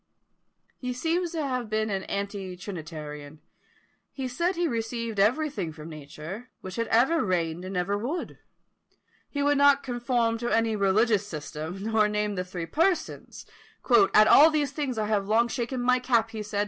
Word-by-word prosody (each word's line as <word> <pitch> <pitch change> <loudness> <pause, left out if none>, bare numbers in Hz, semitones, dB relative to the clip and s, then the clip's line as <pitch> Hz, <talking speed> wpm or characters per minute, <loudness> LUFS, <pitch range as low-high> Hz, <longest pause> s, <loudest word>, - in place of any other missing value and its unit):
He 250 -1 -3
seems 330 +6 -1
to 320 -2 -2
have 250 -4 -2
been 215 0 0
an 195 -1 -2
anti 200 -2 -4
trinitarian. 155 -5 -8 0.7
He 265 -2 -4
said 340 +9 -1
he 345 0 +1
received 230 -3 -3
everything 220 - +1
from 155 +1 -10
nature, 155 - -9
which 185 0 -7
had 230 0 -1
ever 265 +9 +3
reigned 175 -3 -1
and 185 0 -5
ever 185 +3 0
would. 250 +12 -4 0.9
He 285 -1 -2
would 290 0 +3
not 285 0 +5
conform 240 -2 0
to 240 0 -2
any 225 -1 +2
religious 205 +1 +2
system, 160 +2 -6
nor 220 -1 +2
name 210 0 -1
the 180 -2 -2
three 180 -2 -6
Persons, 330 - -1 0.7
"At 215 0 +7
all 305 +3 +8
these 295 -4 0
things 275 -4 -3
I 215 - 0
have 205 -2 0
long 225 +3 +3
shaken 240 +2 -3
my 250 +1 +3
cap," 235 -3 +1
he 220 -2 -5
said. 210 -1 -4
220 Hz, 170 wpm, -27 LUFS, 190-255 Hz, 0.9 s, all